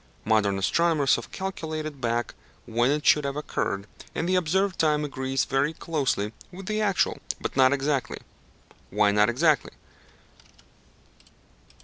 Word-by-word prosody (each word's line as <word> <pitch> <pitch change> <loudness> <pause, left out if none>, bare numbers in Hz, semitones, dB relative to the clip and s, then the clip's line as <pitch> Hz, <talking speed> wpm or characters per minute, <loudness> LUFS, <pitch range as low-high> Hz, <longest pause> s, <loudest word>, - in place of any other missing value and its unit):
Modern 105 -2 +2
astronomers 155 - +2
have 120 - -7
calculated 155 -6 -5
back 120 0 -1 0.3
when 120 +2 +1
it 150 +1 0
should 150 - +5
have 140 0 -3
occurred, 100 -9 -2 0.3
and 165 - -1
the 185 - +1
observed 185 +2 +1
time 150 -1 +2
agrees 135 -1 -1
very 140 +3 0
closely 135 -11 -1 0.2
with 190 +1 -9
the 215 +2 -1
actual, 200 -3 +1 0.2
but - - -4
not 130 -1 +5
exactly. 140 -1 -1 0.7
Why 105 -1 +3
not 105 +2 +4
exactly? 150 +3 +2
145 Hz, 130 wpm, -26 LUFS, 120-160 Hz, 0.7 s, should